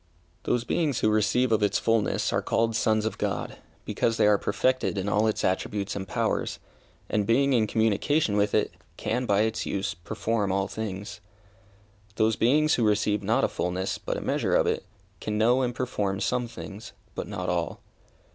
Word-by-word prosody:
Those 120 - +1
beings 145 -1 0
who 110 - +3
receive 110 +4 +2
of 110 -1 +3
its 105 - +2
fulness 115 -2 +1
are - - +2
called 115 0 0
sons 110 -1 +2
of 110 - -3
God, - - -2 0.3
because 115 -1 0
they - - +4
are 105 -1 +4
perfected 130 0 0
in 95 +1 -2
all 105 +2 +2
its 110 - -1
attributes 100 +2 -1
and 95 -1 -4
powers, - - -1 0.5
and 105 -2 0
being 140 +4 +3
in 110 -3 +3
communication 110 +4 +1
with 105 0 +2
it, - - +1 0.2
can, 125 +2 -1
by 100 0 +3
its 110 0 -1
use, 95 -4 -2
perform 105 +3 -2
all 95 +1 0
things. 100 -2 -6 0.9
Those 110 0 +2
beings 150 +6 +3
who 120 - +2
receive 105 -1 +2
not 110 +3 +1
a - - +4
fulness, 90 +2 -2
but - - -3
a - - -4
measure - - 0
of - - +4
it, - - -1 0.3
can 105 0 -3
know 120 +4 +4
and 120 -2 -1
perform 105 -7 -2
some 125 +3 0
things, 110 0 -9 0.2
but - - -5
not 90 -3 -4
all. 85 -1 -1
110 Hz, 185 wpm, -27 LUFS, 100-115 Hz, 0.9 s, they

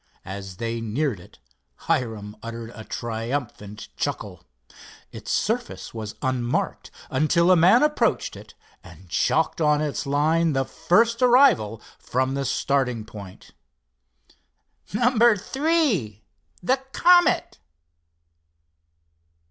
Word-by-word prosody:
As 95 0 -7
they 115 +1 -3
neared 115 - -2
it 90 - -17 0.5
Hiram 110 -4 -2
uttered 115 0 -7
a 110 - -9
triumphant 115 -2 -5
chuckle. - - -4 0.7
Its - - -9
surface - - -2
was 110 -2 -6
unmarked 125 -2 -2 0.2
until 170 +6 +3
a - - +7
man 185 - +5
approached 300 0 +1
it, - - -13 0.3
and - - -15
chalked - - 0
on 150 -1 +3
its 150 -1 -3
line 155 +3 +2
the 135 -1 0
first 230 - +1
arrival 240 - +4 0.2
from 130 +2 -1
starting 125 -4 0
point. 100 -4 -12 1.4
"_No. 235 -1 +3
Three—the 190 - -1 0.2
Comet. 350 0 +3
135 Hz, 100 wpm, -24 LUFS, 110-185 Hz, 1.4 s, a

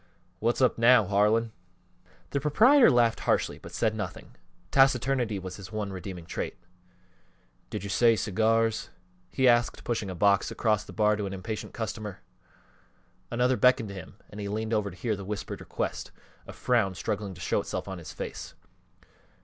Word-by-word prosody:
"What's 120 +4 0
up 125 - +2
now, 115 -2 +6
Harlan?" 105 +4 +2 0.8
The 140 - 0
proprietor 230 - +6
laughed 120 -4 +3
harshly - - 0
but - - -11
said 110 -1 0
nothing 100 -5 -6 0.4
taciturnity 130 -4 +3
was 95 -1 -7
his 100 -1 -10
one 105 -2 -3
redeeming 90 -2 -7
trait. - - -4 1.1
"Did 105 - -5
you 100 - -5
say 115 +2 +4
cigars?" 110 +2 +1 0.4
he 130 -1 +2
asked, 120 -1 +3
pushing 110 -4 -2
a 95 - -5
box 100 +2 +3
across 105 -2 0
the - - -11
bar 105 -1 +2
to 105 -1 -3
an 95 - -5
impatient 105 +3 -6
customer. 110 -3 -5 1.1
Another 125 +2 +1
beckoned 125 -4 +3
to - - -7
him 95 0 -10 0.2
and 105 - -9
he 100 - -4
leaned 110 +2 -3
over 105 -2 +1
to 95 - -13
hear 110 -1 -1
the 100 - -8
whispered 100 +1 -5
request, - - -4 0.4
a - - -7
frown 105 -7 +1
struggling 100 +1 -3
to - - -13
show - - 0
itself - - -5
on 95 -2 -6
his 85 - -9
face. - - -7
110 Hz, 170 wpm, -28 LUFS, 100-120 Hz, 1.1 s, now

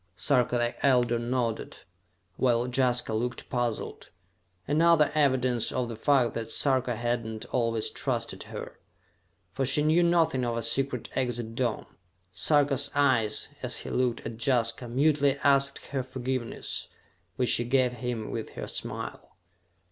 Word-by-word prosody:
Sarka 125 -3 +2
the 120 0 -2
Elder 125 -3 +3
nodded, 120 -1 -3 0.5
while 120 0 +2
Jaska 125 -2 +1
looked 120 +2 -3
puzzled. 120 -3 -3 0.6
Another 155 +1 +4
evidence 130 -5 +2
of 125 -2 -2
the 115 - -5
fact 125 +1 +2
that 115 -1 -4
Sarka 130 -3 +2
had 120 +1 -1
not 110 -1 -6
always 115 -3 0
trusted - - -2
her, - - -8 0.7
for 135 - -1
she 135 +3 +2
knew 160 +3 +4
nothing 165 -7 +2
of 120 -1 -1
a 115 - -2
secret 125 +2 +1
exit 120 -3 -2
dome. 120 -2 -1 0.5
Sarka's 140 +6 +2
eyes, 125 -7 +2
as - - -1
he - - -7
looked 125 -2 0
at 115 -1 -6
Jaska, 120 -2 +1
mutely 140 +2 +2
asked 140 0 +2
her 135 -2 -1
forgiveness, 130 -1 -4 0.5
which 125 +2 +1
she 120 - +3
gave 125 0 +2
him 120 -2 -4
with 115 - -5
her - - -5
smile. - - -6
125 Hz, 140 wpm, -28 LUFS, 120-135 Hz, 0.7 s, Another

